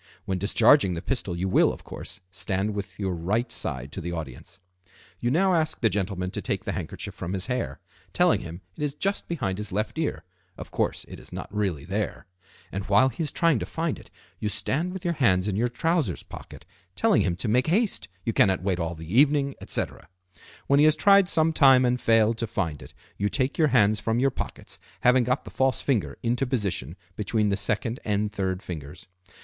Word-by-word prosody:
When 95 -2 -1
discharging 110 +1 +4
the 85 - -4
pistol 110 -9 -2
you 95 +2 -1
will, 95 - +4
of - - -10
course, - - -8
stand 95 +2 -1
with 100 -1 -6
your 95 -2 -1
right 105 +9 -1
side 70 - -4
to 95 - -6
the 85 0 -4
audience. 75 -7 -8 0.6
You 120 - 0
now 185 +7 +3
ask 160 -2 +1
the 110 -3 +2
gentleman 95 -1 -2
to - - -4
take - - -2
the - - -2
handkerchief - - -5
from 90 - -5
his 95 -1 -2
hair, 120 - -3 0.3
telling - - +3
him 85 +2 -8
it - - -10
is 145 -1 -1
just 195 +6 -2
behind 110 - -2
his 105 -1 -6
left 105 +10 -2
ear 160 - -2 0.3
(of - - -9
course - - -1
it - - -9
is - - -13
not - - -7
really 95 -9 -1
there); 100 +2 -3 0.5
and 95 +2 -3
while 105 +6 +5
he 130 - -6
is 155 - -1
trying 165 -7 +2
to - - -3
find 165 -2 -2
it - - -16 0.3
you 105 - -1
stand 160 - -1
with 190 0 -7
your 170 - +1
hands 105 - +2
in 100 - -1
your 115 +4 +2
trousers 145 - 0
pockets, - - -11 0.3
telling - - +3
him 90 -2 0
to 95 - -4
make 125 +6 +2
haste, 205 +6 +1 0.2
you 115 - 0
cannot 95 -4 +3
wait 95 -2 0
all 85 0 -2
the 80 +5 -6
evening, 140 -1 +3
etc. - - -4 0.6
When 140 +1 +4
he 150 - +6
has 155 0 +5
tried 200 +3 +5
some 160 -2 +2
time 135 -4 +6
and 125 0 +1
failed 115 0 +3
to 115 - -1
find 85 -9 -2
it - - -13 0.2
you 100 +1 0
take 135 +5 -1
your 155 - +5
hands 110 -6 +4
from 110 +1 0
your 135 +2 +3
pockets, - - -7 0.2
having 125 0 +5
got 125 +4 0
the - - -10
false 130 -2 +1
finger 100 - -1
into 125 +3 0
position 100 - -2 0.2
between 105 0 0
the 100 - +2
second 105 +4 -2
and 105 0 0
third 95 -2 -2
fingers. 80 0 -8
110 Hz, 210 wpm, -26 LUFS, 95-135 Hz, 0.6 s, he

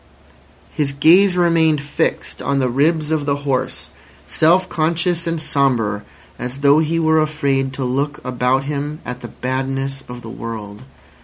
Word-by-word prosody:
His 140 -2 -1
gaze 180 +6 +5
remained 165 -3 +3
fixed 145 +1 -2
on 140 - 0
the 130 -2 +1
ribs 155 +4 +1
of 150 -2 -1
the 140 - +2
horse, 130 -2 -2 0.3
self 180 +4 +3
conscious 170 0 0
and 165 -1 -1
sombre, 130 -9 +1 0.4
as 125 +3 -5
though 145 +1 +5
he 160 +1 0
were 160 -1 +3
afraid 140 -3 0
to 135 - -4
look 140 +4 -1
about 125 +1 +1
him 145 +2 -4
at 125 0 -6
the - - -7
badness 135 +1 -3
of 125 0 -8
the 115 - -8
world. 110 -3 -7
140 Hz, 155 wpm, -19 LUFS, 130-160 Hz, 0.4 s, gaze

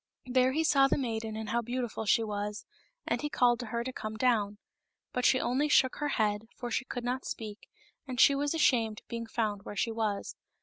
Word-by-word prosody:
There 255 0 +3
he 320 +3 +1
saw 275 -3 +5
the - - +1
maiden 225 -4 -3
and 220 -1 -5
how 235 +2 +1
beautiful 240 -2 -3
she 225 - +4
was, 210 0 -4 0.4
and - - -1
he 295 - -2
called 240 -4 +3
to 245 - -5
her 235 +2 -2
to 260 +1 -5
come 215 -2 -5
down. 215 -4 +1 0.6
But 250 - 0
she 260 - +5
only 270 +5 +1
shook 260 -3 +4
her 295 - -1
head, 210 0 0
for 240 -2 -5
she 260 - -1
could 245 -2 -5
not 250 +2 -2
speak, 215 -2 -7 0.4
and 255 -2 -4
she 280 - +7
was 285 +3 0
ashamed 225 -8 +2
of - - -48
being 230 -1 -4
found 215 -3 -1
where 205 - -8
she 230 +3 0
was. 215 -3 -2
235 Hz, 220 wpm, -30 LUFS, 220-255 Hz, 0.6 s, she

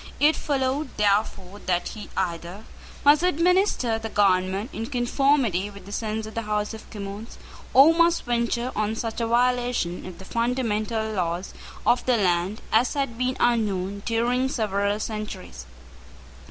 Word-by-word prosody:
It 305 +2 +5
followed, 275 0 -1
therefore, 200 -2 0
that 175 -1 0
he 215 -2 -9
either 175 +2 -3 0.4
must 290 +2 +6
administer 355 - +2
the 225 0 -5
government 195 +2 +1
in 225 +1 -4
conformity 245 -6 +1
with 200 -2 -12
the 200 - -10
sense 220 0 -3
of 220 - -9
the 230 - -2
House 210 0 -2
of 220 - -10
Commons, 205 +1 -7 0.3
or 285 +5 +7
must 335 0 +3
venture 240 +1 -1
on 215 +1 0
such 225 0 -3
a 230 - 0
violation 245 -7 +1
of 180 -2 -9
the 190 - -11
fundamental 225 -2 -1
laws 180 -2 -2 0.3
of 245 - +3
the 250 -2 +4
land 185 +1 0
as 235 +5 +3
had 275 -5 -1
been 255 +2 -1
unknown 200 -4 0
during 245 +3 +1
several 205 -4 0
centuries. 210 - -6
220 Hz, 150 wpm, -25 LUFS, 200-250 Hz, 0.4 s, or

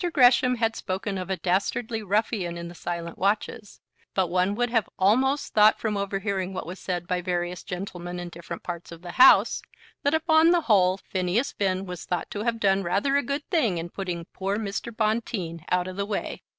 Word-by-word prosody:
Gresham 250 -1 +5
had 225 -1 0
spoken 190 +1 -3
of 185 - -6
a 190 - -1
"dastardly 200 +6 -1
ruffian 205 -3 -1
in 170 0 -6
the - - -10
silent 170 -1 -5
watches," 205 +1 -1 0.4
but 185 -3 +1
one 185 +3 +2
would 245 +1 0
have 225 -4 +1
almost 260 +9 +2
thought 215 0 +6
from 215 -2 -1
overhearing 195 -1 -2
what - - -4
was 180 +3 -7
said 175 -2 -3
by 180 0 -1
various 175 0 -2
gentlemen 180 -1 -6
in 175 0 -5
different 170 0 -8
parts 170 -1 -6
of 170 0 -11
the 175 - -6
House 250 - +6 0.4
that 285 +2 +2
upon 320 0 +4
the 350 0 +4
whole 190 - +3
Phineas 190 +7 -1
Finn 190 -1 -1
was 180 -2 -7
thought 180 - -3
to 205 - -4
have 230 0 -1
done 195 -2 +3
rather 195 +10 +1
a 285 - +4
good 280 +2 -3
thing 240 - +2
in 165 +1 -4
putting 175 -4 -4
poor 195 +1 -2
Mr. 215 +2 -4
Bonteen 215 -7 -2
out 180 0 +1
of 185 0 -7
the 200 - -1
way. 205 - -3
195 Hz, 200 wpm, -26 LUFS, 180-225 Hz, 0.4 s, thought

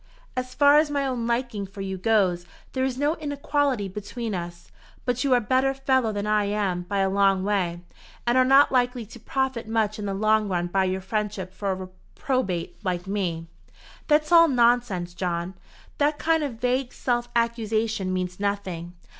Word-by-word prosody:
As 255 0 -4
far 285 +1 +6
as 305 -1 +1
my 285 -1 0
own 245 -3 -2
liking 235 -4 -1
for 195 +1 -9
you 190 0 -3
goes, 185 -3 +1 0.3
there 260 - 0
is 260 -1 -1
no 290 +4 +1
inequality 285 -6 -1
between 210 +4 -5
us; 175 -1 -6 0.3
but 245 0 0
you 270 -3 +4
are - - +5
a - - 0
better 260 +4 +1
fellow 260 -4 +1
than 205 -1 -3
I 210 -1 +2
am 200 -3 -1
by 200 -1 +1
a 195 - +2
long 195 -1 +2
way, 185 -4 -1 0.4
and 240 +1 +2
are 255 - +6
not 270 +2 +5
likely 245 -2 +1
to 230 +3 -13
profit 260 0 -2
much 220 -1 0
in 205 - -3
the 195 - -2
long 215 +1 +2
run 175 -2 0
by 190 +2 +1
your 190 +1 -1
friendship 200 -2 -3
for 200 0 -2
a - - -1
reprobate 185 +1 -4
like 180 -2 -2
me." 185 -5 -2 0.6
"That's 305 +1 +2
all 335 -1 +8
nonsense, 235 - +2
John. 175 0 -3 0.5
That 295 +1 +2
kind 320 0 +2
of 280 -5 -3
vague 250 +1 0
self 240 -1 -1
accusation 225 -3 0
means 180 0 -3
nothing. 190 -4 -3
215 Hz, 185 wpm, -25 LUFS, 190-255 Hz, 0.6 s, all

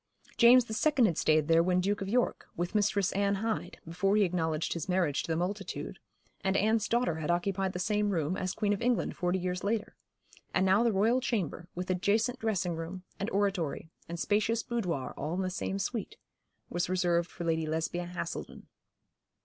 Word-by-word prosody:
James 245 +1 +7
the 220 - -6
Second 270 +1 +3
had 175 -6 +2
stayed 155 -1 +3
there 165 0 +5
when 180 +1 +2
Duke 200 +3 0
of 195 - -3
York, 245 +3 0
with 175 +3 -2
Mistress 205 -2 +2
Anne 200 0 +1
Hyde, 220 +2 -3
before 180 +5 +1
he 210 - +5
acknowledged 165 -4 0
his 170 +1 -5
marriage 180 -6 +1
to - - -5
the - - +1
multitude; 195 +4 -4 0.4
and 190 0 +2
Anne's 220 +1 +2
daughter 235 -9 +1
had 160 0 -4
occupied 190 +2 0
the - - -3
same 210 +3 +1
room 165 -2 0
as 185 -1 -3
Queen 205 -2 +1
of 200 - -4
England 245 -1 +1
forty 180 0 0
years 180 0 -3
later; 215 +1 -1 0.6
and 190 - +3
now 190 +3 +4
the 235 -1 +3
Royal 220 +6 +2
Chamber, 185 - -2
with 180 +1 -3
adjacent 215 +7 +1
dressing 195 -7 -1
room, 165 +3 -6 0.2
and 200 - -2
oratory, 190 -7 -1 0.2
and 170 0 -5
spacious 215 +4 +1
boudoir 180 - -2
all 155 +4 -3
in 190 - -1
the 185 -1 -2
same 195 +1 -3
suite, 205 +2 -3 0.5
was 175 0 -2
reserved 175 -2 +1
for 175 - -7
Lady 160 -1 0
Lesbia 165 +3 -2
Haselden. 175 0 -6
190 Hz, 190 wpm, -30 LUFS, 175-210 Hz, 0.6 s, James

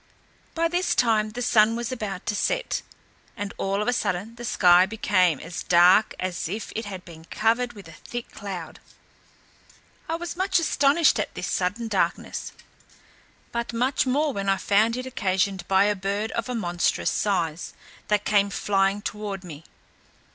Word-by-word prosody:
By 335 0 +2
this 355 +2 0
time 220 -3 +2
the 245 +3 -5
sun 225 -1 +4
was 235 0 -3
about 210 -7 -5
to 210 - -1
set, - - -1 0.6
and 205 0 -4
all 195 +2 0
of - - -6
a 245 - +2
sudden 205 0 -2
the 240 +1 -10
sky 180 -5 +5
became 185 -7 +2
as 175 +1 -6
dark 180 +4 +5
as 180 -3 -3
if 210 +4 -5
it 225 - -3
had 190 -3 -7
been 165 -2 -12
covered 230 +6 0
with 200 -5 -12
a - - -11
thick 240 +9 -8
cloud. 190 -5 -7 1.3
I 325 - 0
was 340 0 -5
much 375 +1 +1
astonished 290 -4 +3
at 210 - -3
this - - -4
sudden 200 +6 -1
darkness, 190 -5 -1 1.0
but 235 0 -3
much 255 +3 +1
more 290 +3 +1
when 195 -2 -2
I 195 - +3
found 215 +5 +2
it 255 - -4
occasioned 190 -5 -1
by 190 0 +4
a 205 0 +2
bird 200 +3 -2
of 230 +2 -3
a 250 - -2
monstrous 175 -5 0
size, 175 -5 -1 0.3
that 210 -1 +1
came 200 -1 +3
flying 195 0 0
toward 205 -2 -5
me. 160 -3 -10
205 Hz, 170 wpm, -25 LUFS, 185-235 Hz, 1.3 s, sky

